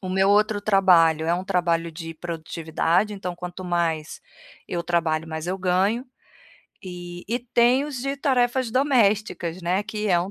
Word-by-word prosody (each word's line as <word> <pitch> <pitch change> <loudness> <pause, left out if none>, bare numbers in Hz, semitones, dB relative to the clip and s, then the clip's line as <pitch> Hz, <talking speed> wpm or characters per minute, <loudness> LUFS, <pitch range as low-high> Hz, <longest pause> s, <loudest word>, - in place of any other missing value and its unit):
O 185 - -6
meu 190 +1 +2
outro 210 +1 +3
trabalho, 175 -6 +4
é 170 - +2
um 180 +1 -4
trabalho 170 -3 0
de 165 0 -8
produtividade, 165 +4 -1
então 185 -3 -5
quanto 180 +1 -8
mais 165 -3 -1 0.5
eu 175 - -2
trabalho, 165 -2 0
mais 160 +1 -5
eu 190 +1 -2
ganho, 195 +7 +1 0.8
e 175 -1 -8
e 235 +2 0
tem 245 +2 +2
os 290 -3 -5
de 275 +2 -2
tarefas 255 -2 +1
domésticas, 215 - +1
né, 180 +3 +1
que 210 0 -3
é 175 - +4
um 180 +3 -3
185 Hz, 165 wpm, -24 LUFS, 170-215 Hz, 0.8 s, trabalho